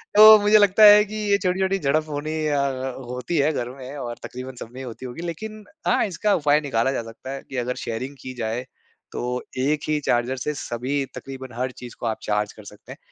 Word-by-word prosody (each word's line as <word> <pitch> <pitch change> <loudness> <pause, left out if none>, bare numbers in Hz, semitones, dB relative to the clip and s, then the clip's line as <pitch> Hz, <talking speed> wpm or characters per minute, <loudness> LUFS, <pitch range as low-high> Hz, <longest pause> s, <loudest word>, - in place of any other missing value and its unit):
तो 215 +1 +11
मुझे 210 +1 +5
लगता 205 0 +5
है 210 0 +9
कि 215 +1 -8 0.2
ये 200 - +5
छोटी-छोटी 190 +1 +1
झड़प 155 +1 +1
होनी 150 +2 -3
अ 145 - +1
अ, 135 -1 -1 0.2
होती 125 +7 -3
है 145 +2 +3
घर 120 -5 -3
में 135 +1 -9
और 120 -3 -5
तक़रीबन 130 +1 -7
सब - - -8
में 125 - -10
ही - - -6
होती 125 +2 -8
होगी। 125 +6 -7
लेकिन 215 +6 -6 0.2
हाँ, - - +3
इसका 205 +2 0
उपाय 150 0 +3
निकाला 130 -2 0
जा 135 - -2
सकता 115 +3 -9
है 135 - -5
कि 135 - -5
अगर 125 +1 -1
शेयरिंग 125 +5 -4
की 130 - -7
जाए, 115 +3 -2 0.5
तो 125 +1 -3 0.2
एक 145 +3 +1
ही 155 -1 +1
चार्जर 120 +2 +1
से 150 +4 -2
सभी 130 +4 -2
तक़रीबन 130 -2 -8
हर 125 +1 -2
चीज़ 125 -1 -11
को - - -5
आप 110 -1 -1
चार्ज 105 0 -1
कर 110 - -13
सकते 105 0 -13
हैं। - - -9
135 Hz, 230 wpm, -23 LUFS, 125-160 Hz, 0.5 s, तो